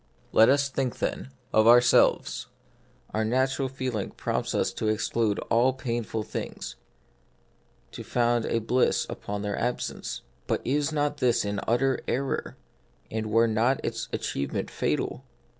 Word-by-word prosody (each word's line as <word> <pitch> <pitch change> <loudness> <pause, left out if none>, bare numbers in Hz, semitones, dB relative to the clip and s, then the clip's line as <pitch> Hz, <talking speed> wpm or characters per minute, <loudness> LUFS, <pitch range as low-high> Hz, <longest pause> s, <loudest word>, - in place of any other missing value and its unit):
Let 110 +2 +6
us 140 +1 +4
think, 135 -3 -2
then, 65 - -3 0.2
of 110 0 +5
ourselves: 120 +1 +5 0.6
our 110 - 0
natural 130 +4 +1
feeling 130 -6 -3
prompts - - -2
us - - +1
to 110 - -2
exclude 110 0 +1
all 125 +3 +4
painful 120 -4 -3
things; - - -6 1.2
to - - -7
found 120 -1 +1
a - - +1
bliss 125 +3 +2
upon 100 0 -5
their 100 -1 -2
absence. 125 - -3 0.2
But - - -1
is 145 +3 +1
not 145 -1 0
this 120 -5 +2
an 100 0 -2
utter 130 +3 +2
error, 135 +2 -2 0.5
and 110 0 -2
were 115 +2 +4
not 115 +4 +2
its - - -3
achievement 70 - -3
fatal 130 - -1
120 Hz, 140 wpm, -27 LUFS, 110-130 Hz, 1.2 s, Let